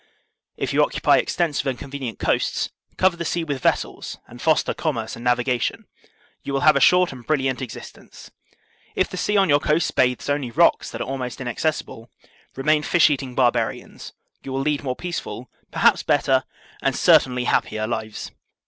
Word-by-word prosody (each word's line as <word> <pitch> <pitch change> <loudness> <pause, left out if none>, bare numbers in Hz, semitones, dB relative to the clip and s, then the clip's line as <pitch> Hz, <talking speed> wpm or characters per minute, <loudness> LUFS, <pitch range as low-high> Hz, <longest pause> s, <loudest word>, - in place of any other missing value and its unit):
* - - -60
If - - -2
you - - +4
occupy - - +2
extensive 160 -6 -1
and 130 -2 -1
convenient 135 -4 -6
coasts, - - 0 0.3
cover 185 -1 +3
the 170 - -3
sea 170 +1 -1
with 145 -5 -4
vessels - - -1
and 120 - -13
foster 160 -1 +2
commerce 115 -9 -3
and 115 - -10
navigation; 125 0 0 0.6
you 140 - -5
will 135 - 0
have 155 -1 +6
a - - +3
short 180 +5 +5
and 130 -3 -10
brilliant 135 -2 0
existence. 125 -4 -10 0.6
If 185 - +1
the - - -7
sea 210 +3 +1
on 195 - +4
your 145 -2 +4
coasts 155 +2 +1
bathes 125 -1 +1
only 145 -3 -1
rocks 115 - +3
that - - -6
are - - -3
almost 130 -2 -4
inaccessible, 125 -2 -3 0.5
remain 150 +3 +2
fish 160 0 +4
eating 135 -3 -3
barbarians; 120 -3 -1 0.3
you 135 - -8
will 135 +1 -1
lead 145 0 -1
more 130 -2 -2
peace 175 +3 -4
ful, 125 - -9 0.2
perhaps - - +3
better, - - +2 0.4
and - - 0
certainly 125 -1 +4
happier 110 -2 0
lives. 110 -2 -5
135 Hz, 175 wpm, -22 LUFS, 125-155 Hz, 0.6 s, have